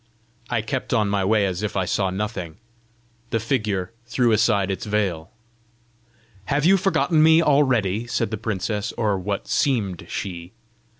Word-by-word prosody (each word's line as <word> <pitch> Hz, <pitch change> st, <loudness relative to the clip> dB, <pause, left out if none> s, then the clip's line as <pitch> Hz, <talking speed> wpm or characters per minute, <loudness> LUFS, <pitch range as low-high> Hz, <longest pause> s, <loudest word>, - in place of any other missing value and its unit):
I 115 Hz, -3 st, 0 dB
kept 130 Hz, +1 st, -2 dB
on 105 Hz, -2 st, +2 dB
my 100 Hz, -1 st, +1 dB
way 105 Hz, +1 st, +3 dB
as 95 Hz, -1 st, -2 dB
if 105 Hz, -1 st, -3 dB
I 95 Hz, -, +1 dB
saw 95 Hz, +1 st, 0 dB
nothing. 95 Hz, -4 st, -4 dB, 0.7 s
The 115 Hz, -, 0 dB
figure 105 Hz, -6 st, -1 dB, 0.2 s
threw 120 Hz, -1 st, +2 dB
aside 100 Hz, -3 st, +2 dB
its 105 Hz, +4 st, -5 dB
veil. 100 Hz, -7 st, -1 dB, 1.2 s
"Have 145 Hz, +6 st, 0 dB
you 190 Hz, +3 st, +6 dB
forgotten 180 Hz, -4 st, +2 dB
me 160 Hz, +1 st, +6 dB
already?" 120 Hz, -, +2 dB
said 115 Hz, -2 st, -1 dB
the 110 Hz, -, -2 dB
princess 105 Hz, -1 st, -2 dB
or 105 Hz, -4 st, +1 dB
what 100 Hz, +1 st, -3 dB
seemed 105 Hz, -, 0 dB
she. 90 Hz, -1 st, -6 dB
105 Hz, 155 wpm, -23 LUFS, 95-120 Hz, 1.2 s, you